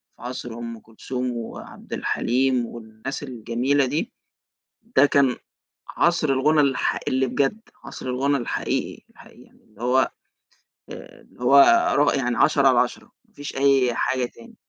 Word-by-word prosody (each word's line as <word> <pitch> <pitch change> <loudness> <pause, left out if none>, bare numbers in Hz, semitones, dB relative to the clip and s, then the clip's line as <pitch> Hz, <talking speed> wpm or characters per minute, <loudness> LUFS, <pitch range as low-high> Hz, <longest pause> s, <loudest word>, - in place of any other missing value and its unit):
في - - -22
عصر 125 -1 -6
أم 115 0 -7
كلثوم 125 +3 -5
وعبد 115 - -9
الحليم 130 0 0
والناس 115 +4 -8
الجميلة 125 +2 0
دي، 145 +5 -3 0.8
ده 135 +2 +7
كان 140 -3 +2 0.5
عصر 170 -3 +1
الغُنا 150 +4 +3
الحق 135 -4 +1
اللي 130 0 +1
بجد، 140 - 0 0.2
عصر - - -9
الغُنا 135 +3 0
الحقيقي، 120 - -3
الحقيقي، - - -18
اللي 110 +1 -19
هو 130 +2 +2 0.8
اللي - - -13
هو 135 +3 +6 0.4
ر 145 0 +3
يعني 125 -2 -1
عشرة - - +4
على - - +4
عشرة - - -3 0.2
مافيش 145 0 -9
أي 135 -3 +3
حاجة 130 +2 0
تاني. 235 - -16
130 Hz, 135 wpm, -23 LUFS, 120-140 Hz, 0.8 s, ده